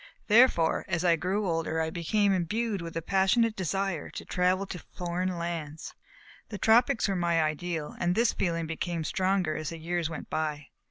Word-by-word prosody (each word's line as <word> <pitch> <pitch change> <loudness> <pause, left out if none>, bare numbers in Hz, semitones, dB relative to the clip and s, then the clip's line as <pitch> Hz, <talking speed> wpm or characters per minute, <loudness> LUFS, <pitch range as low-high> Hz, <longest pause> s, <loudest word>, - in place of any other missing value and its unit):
Therefore, 210 -8 +4
as 175 -1 -1
I 170 -1 +5
grew 190 +5 -1
older, 165 -1 -1
I 160 0 -1
became 200 +4 +1
imbued 200 +3 -1
with 165 -1 -6
a 165 - -3
passionate 195 +5 +2
desire 190 -2 -2
to - - -8
travel 185 +2 +1
in 180 - -5 0.2
foreign 180 +1 -2
lands. 165 -3 -5 0.6
The 210 - -5
tropics 225 +1 +4
were 195 - 0
my 170 -2 +1
ideal, 155 0 -3
and 175 +1 +1
this 230 +2 +3
feeling 165 -2 -1
became 165 +1 -3
stronger 185 -2 0
as 155 0 -3
the 165 - -6
years 170 0 -2
went 165 - -7
by. 150 -2 -3
175 Hz, 175 wpm, -28 LUFS, 165-195 Hz, 0.6 s, I